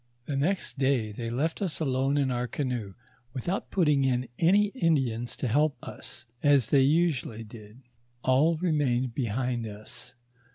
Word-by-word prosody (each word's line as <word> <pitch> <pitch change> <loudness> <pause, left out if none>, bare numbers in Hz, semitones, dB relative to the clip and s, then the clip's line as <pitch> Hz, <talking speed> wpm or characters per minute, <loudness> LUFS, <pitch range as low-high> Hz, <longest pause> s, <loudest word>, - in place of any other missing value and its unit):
The 145 - -3
next 155 +1 -1
day 130 -6 +1
they 115 +2 -5
left 145 - -1
us 185 -6 -2
alone 135 -1 +1
in 135 -2 +1
our 125 0 -1
canoe, 120 -8 -3 0.4
without 175 +10 -3
put 185 -3 +2
ting 145 -2 +3
in 125 -1 +1
any 200 +5 +4
Indians 135 - 0
to 130 - -2
help 145 +4 +2
us, 120 - -8 0.2
as 140 -6 +4
they 140 - +6
usually 140 -6 +1
did; 110 +2 -13 0.4
all 145 +6 +3
re 175 +1 0
mained 130 -5 +1
behind 120 -1 -1
us. 110 +5 -7
130 Hz, 160 wpm, -28 LUFS, 120-150 Hz, 0.4 s, they